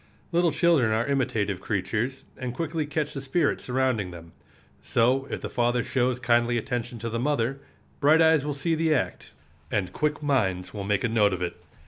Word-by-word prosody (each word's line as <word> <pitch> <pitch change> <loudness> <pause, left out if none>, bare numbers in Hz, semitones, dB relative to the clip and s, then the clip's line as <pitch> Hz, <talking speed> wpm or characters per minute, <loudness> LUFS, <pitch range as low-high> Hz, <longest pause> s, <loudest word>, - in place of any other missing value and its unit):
Little 170 -1 +3
children 150 -8 +3
are 110 +2 +1
imitative 110 -8 0
creatures, 110 +6 -2
and 125 -1 -5
quickly 160 -1 -2
catch 150 0 -2
the 135 - -5
spirit 140 +3 0
surrounding 125 -6 0
them. 85 -1 -11 0.5
So, 130 +4 +2
if - - -4
the - - -3
father 120 0 +1
shows 125 -1 0
kindly 120 -1 +2
attention 120 +1 -3
to 115 +1 -4
the 115 - -1
mother, 135 -1 0 0.4
bright 150 +3 +5
eyes 160 -3 +5
will 145 -1 -2
see 165 +4 -1
the 160 -1 +2
act, 130 - -3 0.4
and 95 -3 -1
quick 150 0 -1
minds 95 -11 0
will 100 -2 -5
make 105 -1 0
a - - +3
note 105 -3 +3
of 90 -1 -2
it. 90 - -3
125 Hz, 185 wpm, -26 LUFS, 110-145 Hz, 0.5 s, bright